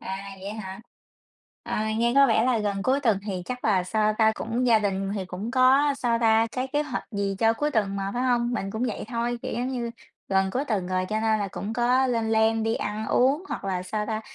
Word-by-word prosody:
À, 190 +1 -5 0.2
vậy 200 +2 -5
hả? 195 -2 -7 0.8
À, 215 0 -2
nghe 235 +1 +2
có 275 0 +7
vẻ 225 -3 +3
là 250 -2 +2
gần 200 -2 -2
cuối 265 +4 +2
tuần 220 -7 +2
thì 185 -3 -3
chắc 250 0 -5
là 190 -4 +2
sao 215 +2 +1
ta? 220 0 +5
Cũng 235 +3 -2
gia 230 -2 +5
đình 195 -1 -1
thì 195 -2 -3
cũng 190 +6 -5
có 270 +3 +4
sao 235 -2 +1
ta? 225 -1 +4
Cái 255 +1 -2
kế 295 +2 0
hoạch 280 -4 -4
gì 200 -2 -2
cho 225 0 +4
cuối 295 +6 -1
tuần 205 -6 0
mà, 195 0 -2
phải 245 - -1
hông? 245 -1 +1
Mình 195 -4 -2
cũng 220 +4 -2
vậy 230 - -3
thôi, 240 0 -2
kiểu, - - -4
giống 245 +2 -2
như 240 -3 -3 0.4
gần 190 0 +2
cuối 260 +6 -1
tuần 205 -9 -1
rồi 185 0 0
cho 215 0 -1
nên 220 -1 +2
là 200 -1 -2
cũng 200 +3 -5
có 250 +3 +2
lên 230 -3 0
plan 220 0 +3
đi 225 +1 0
ăn 215 0 -3
uống 275 - +2
hoặc - - -5
là 185 -2 -2
sao 210 +3 -3
ta? 220 0 -2
220 Hz, 245 wpm, -25 LUFS, 200-245 Hz, 0.8 s, có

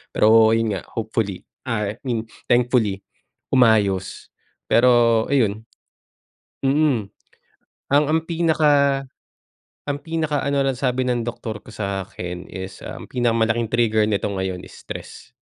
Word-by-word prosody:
Pero 110 +1 +6
'yon 115 -1 0
nga, 95 - -5
hopefully, 110 -4 -3 0.2
ah, 105 -4 -1
I 110 - -13
mean 115 -2 -2 0.2
thankfully, 120 -5 +2 0.5
umayos, 105 -7 +2 0.4
pero 120 -2 +4
ayun 110 -5 0 0.9
mm. 135 -6 +1 0.8
Ang 145 +2 +3
ang 160 - +3
pinaka 150 -5 +2 0.8
ang 145 0 -3
pinaka-ano 145 -4 -1
lang 135 -2 -1
sabi 130 -1 0
ng 120 -2 -1
doktor 110 -2 -5
ko - - -25
sa 100 -2 -4
akin 90 0 -7
is 95 0 -8
ang - - -8
pinaka-malaking 115 -2 +1
trigger 110 -2 +2
nito 105 -1 -1
ngayon 95 -2 -3
is - - -12
stress. - - -10
115 Hz, 125 wpm, -22 LUFS, 105-135 Hz, 0.9 s, Pero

